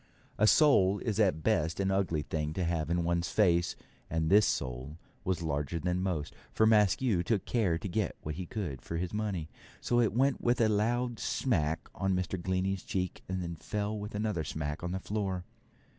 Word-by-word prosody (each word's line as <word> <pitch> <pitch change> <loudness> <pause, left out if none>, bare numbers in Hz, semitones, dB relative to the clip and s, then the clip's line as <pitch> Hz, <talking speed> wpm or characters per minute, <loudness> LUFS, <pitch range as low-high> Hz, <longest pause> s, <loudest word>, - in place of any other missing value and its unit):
A 110 - +5
sole 100 -6 +5
is 110 -1 -2
at 100 -6 +4
the 80 - -10
best 80 +3 +1
an 95 0 +1
ugly 90 -6 0
thing 75 -1 -2
to 90 - -1
have 80 -3 -1
in 85 0 +1
one's 85 0 0
face, 85 -5 +2 0.3
and 80 0 0
this 105 +1 +6
sole 65 +5 -3 0.3
was 90 -2 -1
larger 75 0 -1
than 90 +2 -1
most, 90 -6 -2 0.2
for 110 - +3
Maskew 105 -1 +3
took 105 +1 0
care 100 -9 +1
to 100 - -5
get 100 0 -1
what 75 - -3
he 90 +2 -6
could 95 - -4
for 85 - -4
his 90 +2 -3
money, 100 -7 -2 0.3
so 120 - +1
it 115 -3 +3
went 135 +5 +2
with 120 0 +2
a 115 - +5
loud 120 +3 0
smack 80 - 0
on 95 -1 0
Mr. 90 0 -2
Glennie's 95 +1 -1
cheek, 90 -1 -3
and 95 -1 -2
then 85 0 -4
fell 105 +5 -3
with 105 0 -6
another 105 -6 -1
smack 75 +1 -4
on 90 - -2
the 95 - -2
floor. 95 -3 -3
95 Hz, 200 wpm, -31 LUFS, 85-105 Hz, 0.3 s, this